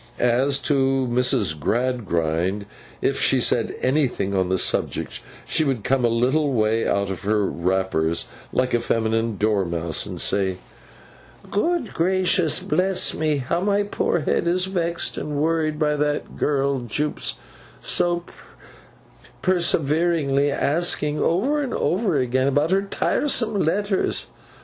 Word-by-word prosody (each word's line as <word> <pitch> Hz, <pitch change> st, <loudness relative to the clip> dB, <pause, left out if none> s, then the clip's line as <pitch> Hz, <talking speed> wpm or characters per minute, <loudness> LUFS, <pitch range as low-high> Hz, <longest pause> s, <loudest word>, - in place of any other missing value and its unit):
As 130 Hz, +3 st, +2 dB
to 135 Hz, -2 st, +2 dB
Mrs. 110 Hz, -10 st, +1 dB
Gradgrind, 95 Hz, -, -1 dB, 0.4 s
if -, -, +1 dB
she -, -, +3 dB
said -, -, +1 dB
anything 130 Hz, -8 st, +1 dB
on 95 Hz, -1 st, +1 dB
the 95 Hz, -, +1 dB
subject, -, -, -1 dB, 0.3 s
she -, -, +1 dB
would 135 Hz, -7 st, -1 dB
come 135 Hz, -1 st, +1 dB
a -, -, +5 dB
little 130 Hz, +5 st, +1 dB
way 110 Hz, -1 st, +1 dB
out 100 Hz, -1 st, 0 dB
of 95 Hz, -, -5 dB
her 105 Hz, 0 st, +1 dB
wrappers, 85 Hz, -3 st, 0 dB, 0.3 s
like 130 Hz, 0 st, 0 dB
a 120 Hz, -, +3 dB
feminine 115 Hz, -1 st, 0 dB
dormouse, 85 Hz, -6 st, -1 dB
and -, -, -6 dB
say: 95 Hz, -2 st, +1 dB, 0.9 s
'Good 330 Hz, +5 st, 0 dB
gracious 180 Hz, -2 st, +1 dB
bless 190 Hz, 0 st, +1 dB
me, 155 Hz, -2 st, 0 dB
how 140 Hz, +6 st, -1 dB
my 200 Hz, +1 st, +2 dB
poor 190 Hz, -4 st, -1 dB
head 150 Hz, -, 0 dB
is 180 Hz, +2 st, +2 dB
vexed 170 Hz, -3 st, -2 dB
and 150 Hz, -1 st, -4 dB
worried 155 Hz, 0 st, 0 dB
by 150 Hz, -1 st, +1 dB
that 150 Hz, 0 st, -2 dB
girl 140 Hz, -2 st, 0 dB
Jupe's 135 Hz, +6 st, -3 dB, 0.4 s
so 175 Hz, -1 st, +1 dB, 1.2 s
perseveringly 160 Hz, -4 st, +2 dB
asking, 150 Hz, -1 st, 0 dB
over 260 Hz, -, +1 dB
and 270 Hz, -, -3 dB
over 190 Hz, -3 st, +1 dB
again, 130 Hz, 0 st, +1 dB
about 145 Hz, +4 st, +1 dB
her 195 Hz, +1 st, +3 dB
tiresome 220 Hz, +3 st, 0 dB
letters! 195 Hz, +4 st, 0 dB
140 Hz, 130 wpm, -23 LUFS, 110-170 Hz, 1.2 s, a